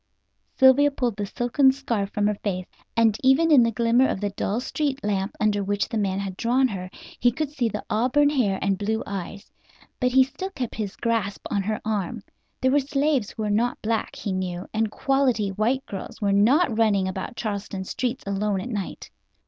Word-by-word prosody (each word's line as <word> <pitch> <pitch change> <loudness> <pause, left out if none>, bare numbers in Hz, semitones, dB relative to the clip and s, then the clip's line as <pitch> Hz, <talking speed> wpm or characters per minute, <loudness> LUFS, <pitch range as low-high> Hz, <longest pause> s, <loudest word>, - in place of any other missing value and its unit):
Sylvia 265 +2 +6
pulled 250 -5 -2
the 205 -1 -3
silken 255 +5 +3
scarf 235 -7 -2
from 205 0 -1
her 210 - +2
face, 185 -3 -2 0.3
and 225 -2 +4
even 270 +5 +4
in 280 -5 +8
the 230 - +3
glimmer 235 +3 +3
of - - -2
the 205 0 -2
dull 200 +2 -2
street 275 +1 -2
lamp 200 -1 -1
under 210 -2 +1
which 205 0 -1
the 230 - -3
man 195 -2 0
had 195 -1 -4
drawn 255 +3 +2
her 185 -3 -5 0.3
he 245 - +4
could 290 +3 -3
see 250 -6 0
the 210 - -5
auburn 260 +6 +2
hair 220 -9 +1
and 195 -1 0
blue 220 +2 -1
eyes. 200 0 -6 0.5
But 250 -1 +1
he 260 +1 +6
still 285 +9 -6
kept 255 - -5
his 210 -3 -4
grasp 225 -4 -2
on 200 - +1
her 215 +2 -2
arm. 215 +1 -2 0.4
There 260 - +3
were 290 - +4
slaves 280 -4 0
who 220 - -5
were 210 - -1
not 235 +4 +1
black, 220 0 -1
he 200 - -4
knew, 185 -1 -3
and 220 0 +1
"quality 260 -4 +1
white" 225 +7 0
girls 195 - -7
were 200 -2 +1
not 240 - +4
running 200 -4 +3
about 190 +5 -5
Charleston 200 -3 -4
streets 250 +6 -3
alone 200 0 -1
at 230 - -5
night. 205 -5 -5
220 Hz, 200 wpm, -24 LUFS, 200-260 Hz, 0.5 s, in